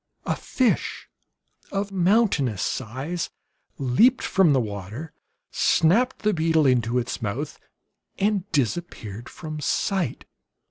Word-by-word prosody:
A - - 0
fish 255 -3 0 0.6
of 200 0 -2
mountainous 180 - +2
size 135 +9 -3 0.5
leaped 180 - +3
from 190 -5 +4
the 135 - +4
water, 110 - -5 0.4
snapped 230 +12 +2
the 215 0 +3
beetle 160 -2 +2
into 125 -2 +2
its 125 +1 -2
mouth, 120 +8 -3 0.6
and 205 -1 0
disappeared 120 - -2
from 155 -2 -7
sight. 160 - -1
155 Hz, 105 wpm, -24 LUFS, 125-195 Hz, 0.6 s, from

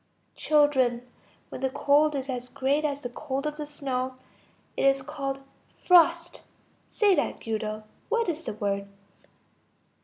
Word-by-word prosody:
Children, 265 -5 +2 0.4
when - - -8
the 265 - +1
cold 290 +3 +3
is 270 -1 -3
as 250 -2 -4
great 280 +3 0
as 285 -2 -1
the 245 - -4
cold 275 +2 -4
of 300 0 -3
the 300 -1 -5
snow, 260 -3 -3 0.6
it - - 0
is 275 -1 +3
called 275 -2 -4 0.4
frost. 340 -1 +4 0.5
Say 415 -3 +3
that, - - 0
Guido. 215 -1 -3 0.3
What 465 -1 +1
is 325 -1 -3
the - - -3
word? 200 -1 -2
275 Hz, 145 wpm, -27 LUFS, 255-300 Hz, 0.6 s, frost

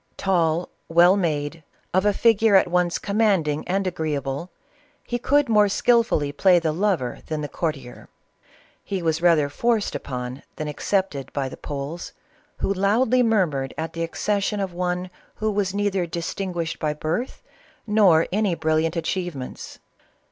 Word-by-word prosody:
" - - -45
Tall, 170 -2 +2 0.2
well 175 +3 +6
made, 160 -4 -2 0.3
of 185 +3 +3
a - - +5
figure 225 0 +4
at 190 - +5
once 175 0 +1
commanding 200 -8 +1
and 195 +2 0
agree 160 -4 -2
able," 140 +5 -4 0.6
he 240 - -2
could 285 +3 +2
more 210 -2 +4
skilfully 230 -10 +2
play 180 +5 +4
the 165 -2 +1
lover 170 -7 -1
than 155 -1 -3
the 145 - -3
courtier. 145 -7 -5 0.7
He 190 -3 -4
was 160 0 0
rather 165 -4 +4
forced 225 +8 0
upon 125 -2 -5
than 155 - -4
accepted 150 -2 -2
by 135 -2 -2
the - - -9
Poles, 145 +4 -6 0.4
who 195 - 0
loudly 220 +6 +2
murmured 175 - +1
at 160 +1 -4
the 165 - -4
accession 200 +5 -1
of 190 -3 -3
one 180 +1 -2 0.2
who 215 0 -1
was 200 -2 0
neither 200 -3 0
distinguished 170 0 -4
by 150 -1 -1
birth 165 - -3 0.4
nor 200 -7 +4
any 200 -2 +1
brilliant 160 +1 0
achievements. 170 -5 -4
175 Hz, 150 wpm, -23 LUFS, 155-200 Hz, 0.7 s, well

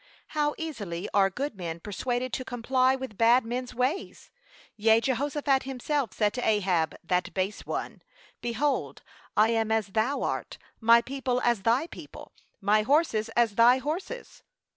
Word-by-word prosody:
How 295 -1 0
easily 205 - -5
are 195 -1 +4
good 270 +5 -4
men 170 -3 -5
persuaded 245 +7 -3
to 255 - -2
comply 255 +1 +1
with 260 -6 -8
bad 235 +2 +5
men's 250 +2 -4
ways. 255 +9 -2 0.4
Yea, 220 +1 +4
Jehoshaphat 270 +2 0
himself 270 -2 -2
said 210 -2 0
to 250 - -3
Ahab, 185 -7 +1
that 180 +1 0
base 195 +2 -2
one: - - -4 0.4
Behold, 250 +5 -1 0.3
'I 215 +1 +5
am 225 -1 +1
as 220 -2 +1
thou 220 +8 0
art, - - -3 0.2
my 235 +1 +6
people 260 -1 -2
as 235 -4 +2
thy 235 +8 +2
people, - - -11 0.3
my 210 +1 +3
horses 230 -3 +1
as 235 -3 +3
thy 235 +4 +6
horses.' 335 - -5
235 Hz, 150 wpm, -27 LUFS, 215-265 Hz, 0.4 s, my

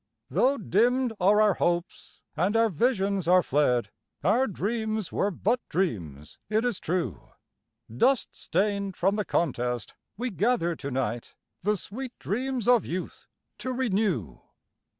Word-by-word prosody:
Though 260 - +2
dimmed 240 +4 +2
are 200 +3 +4
our 210 -2 +5
hopes, 175 -1 -2
and 200 +6 +1
our 225 0 +4
visions 200 - 0
are 180 0 +5
fled, 125 -7 +1 0.3
Our 235 - +3
dreams 215 0 -2
were 200 - +1
but 215 +6 0
dreams, 85 - -3
it 220 +2 +1
is 240 -6 0
true; 160 - -3 0.7
Dust 260 - +3
stained 200 +1 -1
from 195 +3 +2
the 210 -1 -1
contest 125 -6 -1 0.2
we 245 +2 -2
gather 195 -4 +1
to 140 - -6
night, 120 -3 -3 0.3
The 210 +3 +1
sweet 250 +7 -7
dreams 250 +2 -2
of 245 -2 +5
youth 180 +2 -5 0.3
to 255 - -3
renew. 195 - -1
200 Hz, 135 wpm, -27 LUFS, 165-230 Hz, 0.7 s, our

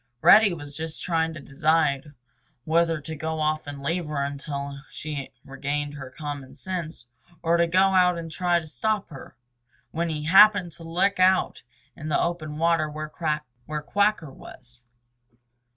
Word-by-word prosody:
Reddy 215 -2 +8
was 145 -4 -7
just 160 +1 -5
trying 165 -2 0
to - - -7
decide 145 0 0 0.5
whether 165 +1 +2
to 160 +2 -7
go 160 +1 -3
off 155 -1 0
and 140 -1 -7
leave 170 +3 -1
her 145 -2 -2
until 140 0 -5
she 155 0 -6
had 140 -2 -5 0.2
regained 145 +2 -3
her 135 -3 -8
common 140 -1 -7
sense, 170 -9 -5 0.4
or 165 0 +3
to 170 0 +3
go 185 +3 +4
out 180 -1 +4
and 165 -1 -6
try 175 0 +1
to 160 - -10
stop 210 +5 -2
her, 135 - -11 0.6
when 170 +1 -1
he 150 -2 -3
happened 190 +1 +6
to 165 +1 -12
look 180 +4 0
out 185 0 +3 0.3
in 155 - -7
the - - +2
open 155 -3 -2
water 165 -1 +2
where 155 0 -6 0.7
Quacker 200 -2 +1
was. 120 -2 -14
160 Hz, 160 wpm, -25 LUFS, 145-170 Hz, 0.7 s, Reddy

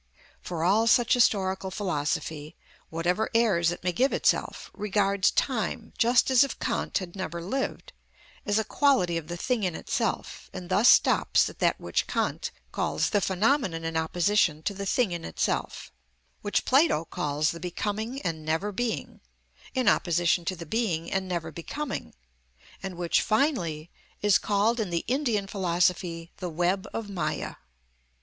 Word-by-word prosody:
For 165 -2 -4
all 210 +6 +3
such 235 0 +4
historical 190 -5 +2
philosophy, 155 -4 -3 0.3
whatever 175 +6 0
airs 195 -8 +3
it 175 - -5
may 180 - +1
give 255 +11 +2
itself, - - 0
regards 200 -1 +1
time 230 -2 -1
just 240 +3 +3
as 260 +1 +7
if 275 - -3
Kant - - -1
had 185 -2 -6
never 170 -3 -4
lived, 235 +11 -4 0.5
as 205 0 +1
a 220 - +2
quality 220 -7 +2
of 165 -2 -3
the 175 +1 -5
thing 245 +5 -1
in 180 -4 -1
itself, - - -3
and 180 -1 -7
thus 210 +6 +5
stops - - +4
at - - -19
that - - +2
which - - -1
Kant - - -1 0.2
calls - - -1
the 205 - +2
phenomenon 190 - +1
in 165 0 -3
opposition 165 0 +1
to 200 - -1
the 200 0 -5
thing 235 -1 +2
in 170 -1 -4
itself; 80 - -2 0.5
which 205 - 0
Plato 265 - +3
calls 150 0 -1
the 170 - -8
becoming 210 +8 -3
and 160 -2 -3
never 160 +7 -1
being, 235 +3 -3 0.5
in 255 -1 +1
opposition 175 0 +2
to 185 - -1
the 170 -1 -8
being 170 -4 -1
and 190 -1 -1
never 170 -3 -3
becoming; 260 - -5 0.7
and 190 -2 -5
which, 175 -1 +2
finally, 180 - 0 0.3
is 205 -2 +4
called 210 +3 +1
in 210 -4 -1
the 170 -1 -2
Indian 240 -5 0
philosophy 175 -3 0
the 180 - -4
web 175 +4 0
of 225 - -4
Mâya. 180 - -3
190 Hz, 155 wpm, -27 LUFS, 170-220 Hz, 0.7 s, as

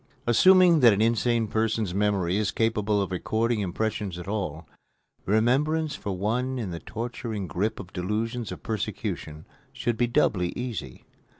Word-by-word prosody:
Assuming 180 +7 +6
that 120 -5 +7
an 100 - 0
insane 115 0 +2
person's 110 -3 0
memory 100 -3 +1
is 105 -1 +1
capable 110 -2 +1
of 95 - -6
recording 110 +5 0
impressions 100 -1 -2
at 90 - -8
all, 90 -7 -3 0.6
remembrance 140 +9 +2
for 100 -2 -4
one 125 +7 -1
in 110 -7 -3
the 85 - -5
torturing 115 -2 -5
grip 100 +7 -2
of 90 -2 -10
delusions 110 +5 -2
of - - -8
persecution 100 -7 -4 0.3
should 120 -2 -2
be 120 +1 +2
doubly 90 -6 +1
easy. 110 - -6
110 Hz, 145 wpm, -26 LUFS, 95-120 Hz, 0.6 s, that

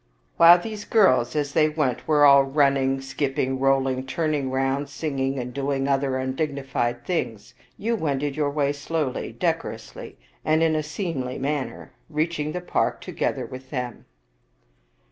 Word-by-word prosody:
While 170 +1 +9
these 210 +2 -6
girls, 130 - +3
as 145 -1 -1
they 155 -1 +4
went, 150 -5 -1
were 150 -2 +5
all 140 -1 +8
running, 135 -1 +2
skip 135 0 -3
50 - - +1
Visakhd - - +2
ping, 130 0 -2
rolling, 135 -1 +1
turning 150 -2 -1
round, 135 +2 -1
singing, 135 -3 -2
and 125 -1 -4
doing 135 0 -1
other 135 -1 +1
un 130 0 -2
dignified 135 -5 -2
things, 115 - -3 0.2
you 230 +2 -1
wended 145 -6 -1
your 150 -2 0
way 145 -1 0
slowly, 145 -1 -3
decorously, - - -4 0.3
and 155 +1 +2
in 160 -1 +2
a 155 - +1
seemly 150 -5 -4
manner, 140 0 -3 0.2
reaching 155 0 -1
the 180 - -4
park 175 - 0
together - - -2
with 130 0 -10
them." 125 -4 -5
140 Hz, 160 wpm, -24 LUFS, 130-155 Hz, 0.3 s, While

